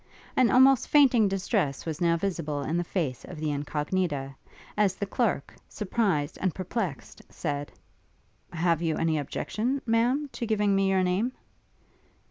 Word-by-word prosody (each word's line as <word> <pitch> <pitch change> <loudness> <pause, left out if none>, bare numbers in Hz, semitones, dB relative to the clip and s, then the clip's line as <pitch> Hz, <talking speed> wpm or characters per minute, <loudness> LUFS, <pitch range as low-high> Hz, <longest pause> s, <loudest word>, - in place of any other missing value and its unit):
An 255 -3 +4
almost 260 0 +5
fainting 260 -7 +5
distress 190 - -1
was 160 -1 -4
now 170 -1 +3
visible 165 -6 -2
in 155 - -2
the 175 - +1
face 160 -8 -3
of 180 - -9
the 155 -1 -2
Incognita, 145 0 -2 0.4
as 200 -3 +2
the 200 - -3
clerk, 200 - -1 0.2
surprised 185 -8 -1
and 185 -3 0
perplexed, 185 - -4
said, 145 -3 -4 0.8
'Have 170 -1 +1
you 160 -2 0
any 160 -1 +1
objection, 235 - -2
Ma'am, 245 +6 +2
to 235 - -4
giving 210 -2 +2
me 195 0 +2
your 190 -1 +2
name?' 195 +8 0
185 Hz, 145 wpm, -27 LUFS, 155-220 Hz, 0.8 s, almost